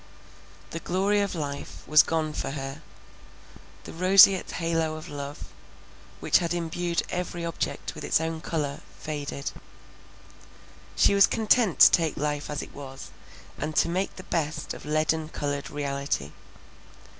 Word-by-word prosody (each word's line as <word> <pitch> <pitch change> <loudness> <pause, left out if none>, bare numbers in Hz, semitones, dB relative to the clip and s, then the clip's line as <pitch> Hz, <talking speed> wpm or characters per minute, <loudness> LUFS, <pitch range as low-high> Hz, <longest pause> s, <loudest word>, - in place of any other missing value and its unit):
The 165 - -4
glory 195 +4 +1
of 200 -2 -2
life 145 -3 -5
was 155 0 +8
gone 160 -2 -1
for - - -3
her; 135 +1 -6 1.0
the - - -9
roseate 190 +2 +6
halo 165 -2 -1
of 155 - -9
love, 145 0 -7 0.7
which - - +4
had 175 0 -1
imbued 170 0 -1
every 175 -1 -3
object 165 - -3
with - - -9
its - - +2
own 160 0 -3
colour, 150 -4 -3 0.2
faded;—she 145 -2 -5 1.6
was 200 0 +6
content 220 -3 +2
to - - +10
take 165 -3 +2
life 150 0 -2
as 150 -1 -3
it - - -12
was, 135 -1 -9 0.5
and 155 +1 -3
to - - +3
make 185 +3 -1
the 185 - -9
best 155 -3 -2
of - - -10
leaden 155 +1 0
coloured 145 -2 -3
reality. 140 - -3
155 Hz, 140 wpm, -26 LUFS, 145-175 Hz, 1.6 s, to